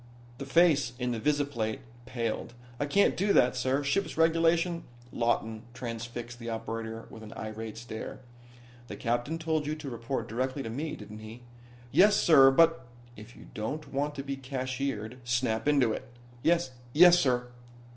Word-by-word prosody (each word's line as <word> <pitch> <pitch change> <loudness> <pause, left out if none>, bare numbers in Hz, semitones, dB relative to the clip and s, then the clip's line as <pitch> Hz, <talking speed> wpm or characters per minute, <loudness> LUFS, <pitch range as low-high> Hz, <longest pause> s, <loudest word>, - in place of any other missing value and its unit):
The 140 - -6
face 150 -4 +4
in 125 -1 -1
the 115 - -2
visiplate 140 -4 -1 0.3
paled. 115 -1 -3 0.2
"I 145 - 0
can't 200 +7 +3
do 200 +2 +2
that, 125 - +4
sir. 130 +3 0
Ship's 155 +8 -1
regulations 165 +1 +2 0.2
" 120 0 -22
Lawton 115 -2 -1
transfixed 120 0 -6
the 115 -1 -6
operator 115 0 -5
with 110 - -10
an 110 0 -10
irate 110 0 -6
stare. 115 -1 -7 0.7
"The - - -6
captain 120 +7 -1
told 160 -2 -1
you 155 - -1
to 150 -3 -7
report 120 +3 -3
directly 130 +4 -2
to 115 - -5
me, 150 +6 -3
didn't 105 0 -10
he?" 110 +3 -10 0.5
"Yes 205 +2 +6
sir, 135 -5 +7
but 165 -1 +3
" 120 - -22
"If 105 +2 -12
you - - -14
don't 140 +8 -5
want 145 +2 -1
to 135 - -4
be 140 0 -4
cashiered, 130 -3 -4
snap 120 -1 0
into 135 -6 +3
it." 130 - -6 0.3
"Yes 170 -1 +2 0.2
yessir." 145 -8 +5
130 Hz, 165 wpm, -29 LUFS, 115-150 Hz, 0.7 s, sir